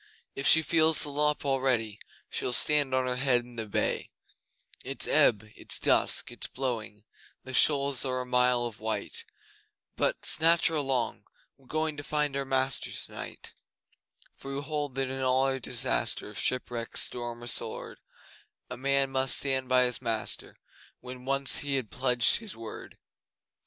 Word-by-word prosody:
If 135 - -1
she 160 - +7
feels 160 0 +3
the 145 - -5
lop 150 +1 0
already 130 -6 0 0.3
She'll 125 - -1
stand 145 -1 +3
on 130 0 +1
her 125 0 -1
head 130 -2 +2
in 120 0 -15
the 110 -1 -5
bay. 100 - -1 0.7
It's - - 0
ebb 110 -2 +4
it's - - -2
dusk - - +2
it's - - 0
blowing, 115 -5 -4 0.4
The 130 - -8
shoals 140 -1 +3
are 130 -1 -1
a - - -6
mile 125 -1 +3
of 115 -3 -6
white, 110 - -3 0.7
But - - 0
(snatch 165 +1 +4
her 165 - -3
along!) 135 -5 -1 0.3
we're 135 - -25
going 155 0 -2
To 145 - -6
find 150 -2 -1
our 140 0 -1
master 135 0 0
tonight. - - -7 0.8
For 135 0 -7
we 140 - -3
hold 145 -2 -3
that 135 -1 -1
in 135 0 -5
all 130 +1 +1
disaster - - 0
Of 105 - -7
shipwreck, 120 -2 -2
storm, 120 -1 -2
or - - -8
sword, 115 -1 -2 0.7
A - - -5
man 140 +1 +1
must 130 -1 +2
stand 130 -2 -1
by 130 0 +5
his 125 -1 -1
master 115 -3 -3 0.4
When 125 0 -10
once 135 0 +3
he 145 -1 -2
had 130 -6 -3
pledged 125 -2 +2
his 215 -4 -8
word! 115 -1 -9
130 Hz, 160 wpm, -29 LUFS, 125-140 Hz, 0.8 s, she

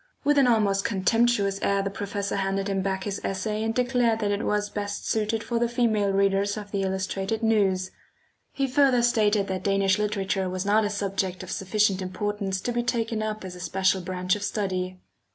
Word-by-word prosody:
With 290 0 +4
an 270 - +5
almost 205 -4 +2
contemptuous 200 0 +1
air 200 0 +1
the 195 - -2
professor 200 0 -3
handed 195 0 -1
him 195 -1 0
back 190 0 -2
his 200 -1 -4
essay 210 +3 -2
and 225 0 0
declared 245 -1 +2
that 205 -1 +1
it 205 +1 -1
was 210 0 0
best 205 -1 -4
suited 220 0 0
for 235 +1 -1
the 240 0 +1
female 225 -4 +1
readers 195 +1 +1
of 205 -1 -7
the 200 - -1
Illustrated 190 +3 -2
News. 190 -4 +2 0.6
He 275 - -1
further 260 -2 +3
stated 215 -4 +3
that 190 -1 -2
Danish 195 0 +2
literature 195 -2 -1
was 185 +1 -3
not 210 +2 +3
a 205 - 0
subject 195 -3 -2
of 185 - -8
sufficient 195 0 +1
importance 195 0 -3
to 245 - -2
be 240 0 0
taken 230 -2 -1
up 215 -2 -3
as 185 - -6
a - - -10
special 190 +1 +1
branch 180 +1 -1
of 210 - -6
study. 185 -3 -2
205 Hz, 195 wpm, -26 LUFS, 190-220 Hz, 0.6 s, an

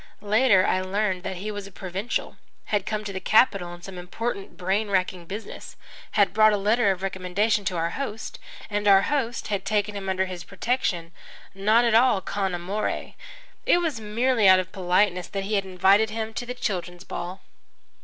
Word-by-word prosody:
Later 210 -2 +4
I 185 - +1
learned 190 0 -1
that 190 - -4
he 205 +4 -5
was 205 -1 -6
a - - -13
provincial, 190 +4 -4 0.4
had 205 -2 +1
come 215 0 -2
to 200 -1 -5
the 190 - -3
capital 195 -4 +3
on 175 0 -10
some 185 -1 -8
important, 200 +3 -5
brain 195 +4 0
racking 185 -2 -1
business, 205 +5 -8 0.4
had 200 -3 +3
brought 215 0 +5
a - - +2
letter 210 +2 +2
of 190 -1 -1
recommendation 195 +3 0
to 180 - -1
our 165 +1 0
host, 225 -6 -5 0.3
and 205 0 -2
our 195 -1 +7
host 260 -6 -1
had 200 -2 -1
taken 210 0 0
him 195 -1 -4
under 190 0 +1
his 180 -2 -7
protection, 185 -3 -2 0.4
not 215 +5 +3
at 230 - +2
all 235 -2 +5
con 190 -1 -2
amore. 190 +5 -3 0.5
It - - +6
was 315 -10 -2
merely 225 +1 +2
out 185 0 +8
of 185 0 -4
politeness 180 0 +1
that 195 -1 -4
he 205 +2 -4
had 200 -2 +1
invited 190 +4 +3
him 220 0 -4
to 245 - -5
the 250 - -4
children's 180 -6 -4
ball. 180 0 -6
200 Hz, 190 wpm, -25 LUFS, 185-215 Hz, 0.5 s, out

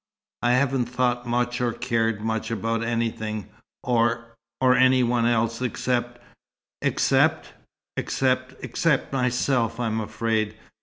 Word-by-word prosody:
I 120 0 +3
haven't 130 -1 +2
thought 125 0 0
much 120 +1 0
or 120 -2 +1
cared 115 -2 0
much 110 0 -2
about 115 0 -1
anything, 115 -2 -2 0.3
or 115 -1 +1 0.3
or 130 -1 +5
any 130 0 +5
one 120 -1 +2 0.4
except 120 -1 -1 0.3
" - - -69
"Except - - +2 0.2
" - - -64
"Except 130 0 0
except 150 -5 0
myself, 125 -2 +1
I'm 110 -2 -1
afraid." 110 0 -1
120 Hz, 120 wpm, -25 LUFS, 115-125 Hz, 0.4 s, or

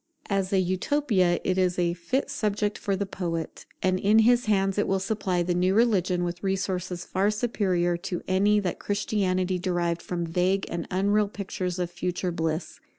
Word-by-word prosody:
As 195 -1 0
an 190 -1 +3
Utopia, 185 -1 +1
it 185 0 +1
is 180 -1 +1
a 175 -1 +1
fit 255 +12 -2
subject 210 -5 -1
for 200 - -1
the 200 +1 -2
poet: 170 -4 -4 0.2
and 185 0 +2
in 210 +3 +4
his 245 +1 +4
hands 195 -1 +2
it - - +1
will 195 - +2
supply 190 -3 -1
the 175 +1 0
new 180 +2 +2
religion 185 -6 +2
with 175 0 -3
resources 185 -2 -2
far 195 +2 +1
superior 190 -6 0
to 175 0 -5
any 200 +3 +3
that 185 -3 -3
Christianity 185 -3 0
derived 175 -2 -1
from 175 -1 -3
vague 180 +4 +1
and 170 0 -3
unreal 200 +3 +2
pictures 190 -3 -4
of 175 -1 -2
future 180 +1 -2
bliss. 160 0 -3
185 Hz, 175 wpm, -26 LUFS, 175-200 Hz, 0.2 s, in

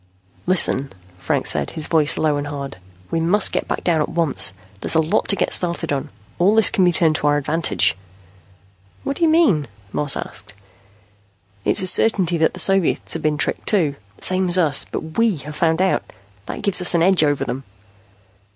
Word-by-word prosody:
"Listen," 140 -6 +2 0.3
Franks - - -1
said, 75 -2 -3
his 155 - -2
voice 155 -3 +1
low 155 -2 +1
and 145 0 -4
hard. 140 -1 -7 0.3
"We 165 - 0
must 185 +5 +2
get - - -2
back - - -4
down 165 -3 +1
at - - -2
once. 165 - +2 0.3
There's - - -2
a - - +4
lot 160 +6 0
to 200 - +4
get - - 0
started 170 -3 +1
on. 135 - -4 0.3
All 195 +5 +3
this 220 - +5
can 200 -5 +1
be 175 - +4
turned 160 -2 +1
to 150 - -1
our 145 0 +3
advantage." 155 +3 +1 1.1
"What 275 - -3
do - - -11
you 325 - +4
mean?" 235 - +2 0.3
Moss 145 -2 +2
asked. 100 +4 -7 1.1
"It's 200 - +2
a - - -1
certainty 180 -3 +1
that 160 - +1
the - - -9
Soviets 195 -3 +1
have 165 - -3
been 155 -1 0
tricked, - - -2
too, 165 -9 +1 0.2
the - - -12
same 185 0 +2
as 175 - +4
us. 155 -6 +2
But 160 +5 -5
we 230 -4 +2
have 150 +1 -8
found 160 +2 +1
out. 190 - +1 0.5
That - - -7
gives 195 -2 +3
us 180 - +3
an 165 - +2
edge 185 -2 +4
over 145 -2 0
them." 135 +2 -5
165 Hz, 200 wpm, -20 LUFS, 145-185 Hz, 1.1 s, this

